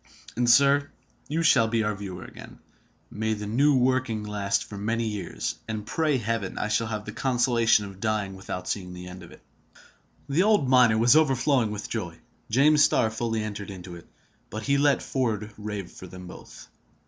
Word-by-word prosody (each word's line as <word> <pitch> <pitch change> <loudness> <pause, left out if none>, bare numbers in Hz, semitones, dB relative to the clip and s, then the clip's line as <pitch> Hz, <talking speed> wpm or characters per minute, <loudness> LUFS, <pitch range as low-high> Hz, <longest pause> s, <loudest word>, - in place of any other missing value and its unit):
"And, 120 +1 +1
sir, 140 +3 +5 0.4
you 160 +3 -1
shall 130 -7 +5
be 110 0 0
our 105 0 0
viewer 95 -3 -7
again. - - -12 0.5
May 110 +1 -1
the 105 0 -6
new 135 +7 +3
working 130 -3 +1
last 105 -1 -1
for 105 - -10
many 115 +3 -1
years, 105 -3 -4
and 110 -2 -4
pray 155 +2 +1
Heaven 115 -4 -3
I 105 - -2
shall 110 +1 +1
have 105 -1 -4
the 105 - -6
consolation 120 -3 +2
of 95 -1 -11
dying 105 -3 -1
without 90 -1 -6
seeing 90 -3 -3
the 90 0 -8
end 90 0 -9
of - - -13
it!" - - -16 0.8
The 145 +5 +2
old 205 -8 +3
miner 125 -4 +5
was 120 +5 +5
overflowing 135 -5 +3
with 105 0 -5
joy. 90 -8 -5 0.3
James 145 +6 +5
Starr 110 -2 +3
fully 115 -1 -2
entered 105 -1 -6
into 90 -2 -9
it; 85 - -13 0.4
but 110 +2 -6
he 140 +5 +2
let 145 -1 +3
Ford 110 -5 -2
rave 105 -3 -6
for 95 - -11
them 90 +1 -10
both. 90 - -12
110 Hz, 185 wpm, -26 LUFS, 105-130 Hz, 0.8 s, sir